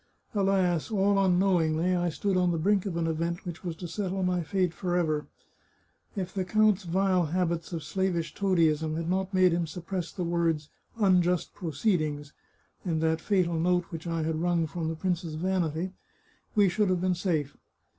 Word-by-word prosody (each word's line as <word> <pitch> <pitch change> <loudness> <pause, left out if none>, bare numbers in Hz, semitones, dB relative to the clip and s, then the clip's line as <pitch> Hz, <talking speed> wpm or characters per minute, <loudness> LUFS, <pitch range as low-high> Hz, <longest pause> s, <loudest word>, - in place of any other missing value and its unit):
Alas, 190 -5 +1
all 200 -2 +2
unknowingly, 180 -2 +2
I 175 -1 +1
stood 195 +4 -1
on 180 -1 +3
the 170 - 0
brink 195 +4 +2
of 175 -3 -3
an 170 - 0
event 170 +3 -2
which 175 0 -7
was 170 -3 -3
to 175 +2 -7
settle 190 +2 -2
my 180 -1 +1
fate 180 +2 0
forever. 175 -5 -1 0.9
If 190 -2 -4
the 190 - -1
count's 210 0 +2
vile 185 0 +2
habits 170 0 -1
of 165 -3 -4
slavish 170 0 -1
toadyism 160 -5 +1
had 165 0 -3
not 190 +1 -1
made 185 -2 +4
him 170 0 0
suppress 180 +2 -5
the 180 - -4
words 165 -3 0 0.2
* - - -41
unjust 180 -4 +2
proceedings 155 -4 -1 0.3
' - - -39
in 170 -4 -1
that 160 0 +1
fatal 180 -5 +1
note 180 +2 +1
which 165 0 -6
I 165 -1 -1
had 160 0 -1
wrung 175 -1 +2
from 160 +1 -4
the 165 - -3
prince's 175 -2 -2
vanity, 175 0 -1 0.6
we 205 -2 +5
should 195 +2 +1
have 180 -1 +1
been 185 0 +2
safe. 165 -6 -1
175 Hz, 180 wpm, -28 LUFS, 165-190 Hz, 0.9 s, we